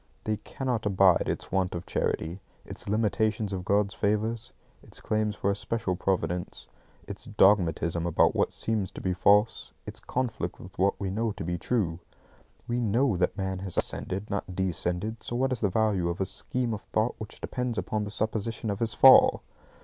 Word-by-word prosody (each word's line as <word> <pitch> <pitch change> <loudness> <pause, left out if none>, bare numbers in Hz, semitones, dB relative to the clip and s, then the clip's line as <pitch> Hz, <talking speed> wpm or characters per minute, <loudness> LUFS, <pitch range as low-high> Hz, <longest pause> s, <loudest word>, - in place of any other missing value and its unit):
They 110 -1 -1
cannot 120 -1 -3
abide 95 -3 +4
its - - -4
want 95 -1 0
of 85 - -5
charity, 85 +4 -2 0.3
it's - - -6
limitations 110 -1 0
of 90 -1 -3
God's 100 +1 +1
favours, 105 +3 -1 0.3
its - - -10
claims 110 -1 -1
for 100 - 0
a - - -1
special 110 -2 -2
Providence, 90 -1 -2 0.4
its 100 +4 -7
dogmatism 85 -6 +2
about 85 - +3
what - - +1
seems 110 -4 -1
to - - -7
be 95 - -1
false, 105 +4 +3
its - - -6
conflict 120 -9 -3
with 90 - -12
what 95 +1 +2
we 95 -2 -2
know 110 +2 -1
to 105 - -6
be 85 +1 -3
true. 90 -9 -1 0.7
We 120 0 -1
KNOW 115 -1 +2
that 90 +3 0
man 95 -1 -2
has 95 -2 -6
ascended, 100 +3 -1
not 95 -2 -3
descended; 95 +4 -2
so 120 - -4
what 130 +2 +1
is 125 - -1
the 100 - +2
value 100 -3 +1
of 85 - -3
a 95 - +1
scheme 125 +4 -2
of 105 - -5
thought 110 +3 0
which 110 - -8
depends 125 -2 -3
upon 110 -1 -1
the 105 - -5
supposition 110 +1 -2
of 100 - -4
his 115 -1 0
fall? 135 - +7
105 Hz, 185 wpm, -28 LUFS, 95-110 Hz, 0.7 s, fall